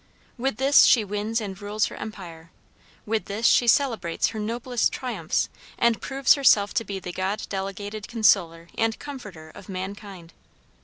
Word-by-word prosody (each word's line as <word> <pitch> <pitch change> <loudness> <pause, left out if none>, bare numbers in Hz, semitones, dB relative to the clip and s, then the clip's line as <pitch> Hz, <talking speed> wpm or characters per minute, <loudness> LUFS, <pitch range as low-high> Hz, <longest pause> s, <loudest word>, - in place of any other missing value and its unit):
With 255 -2 -2
this 275 +2 +6
she 230 - +5
wins 210 +3 -2
and 195 -3 -7
rules 210 +1 0
her - - -6
empire, 170 -6 -9 0.6
with 220 0 -1
this 210 +3 -4
she 240 - +5
celebrates 230 -10 +2
her 220 - -6
noblest 235 +2 -1
triumphs, 215 -11 -2 0.3
and 235 -1 +2
proves 270 -1 +3
herself 215 -8 +4
to 230 - 0
be 200 -3 -5
the 180 -1 -6
God 190 +4 -2
delegated 200 +2 -5
consoler 185 -7 +2
and 225 0 0
comforter 205 - -9
of 200 +2 -14
mankind. 190 -2 -7
210 Hz, 155 wpm, -25 LUFS, 190-230 Hz, 0.6 s, this